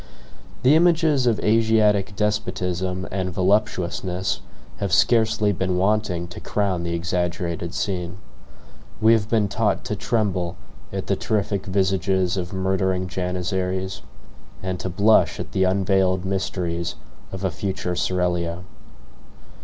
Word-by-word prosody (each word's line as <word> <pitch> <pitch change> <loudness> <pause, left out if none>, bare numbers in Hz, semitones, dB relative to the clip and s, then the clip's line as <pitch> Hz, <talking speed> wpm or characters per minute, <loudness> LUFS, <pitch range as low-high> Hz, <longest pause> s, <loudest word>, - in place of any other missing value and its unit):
The 135 +4 +6
images 160 -5 +3
of 115 -3 +2
Asiatic 105 -3 +3
despotism 95 -3 -1
and 95 -1 -1
voluptuousness 95 -1 0 0.4
have 100 -3 -2
scarcely 110 +4 +3
been 95 -1 -1
wanting 95 -3 +1
to 90 - -8
crown 100 -4 -1
the 85 0 -2
exaggerated 85 -1 -2
scene. 90 -2 -2 0.8
We 110 +1 +6
have 110 -1 +1
been 110 -3 +2
taught - - 0
to - - -2
tremble 95 -7 -1 0.4
at - - -4
the - - +1
terrific 100 -2 -1
visages 95 -1 +1
of 90 -2 -3
murdering 95 -1 0
janizaries, 90 +1 -2 0.6
and 95 -1 -3
to 95 - -3
blush 105 +5 +3
at - - -5
the 95 - +2
unveiled 95 -1 +2
mysteries 90 -3 -2 0.4
of 95 0 -6
a 95 - +1
future 90 +1 -3
seraglio. 90 -1 -1
95 Hz, 120 wpm, -23 LUFS, 90-105 Hz, 0.8 s, The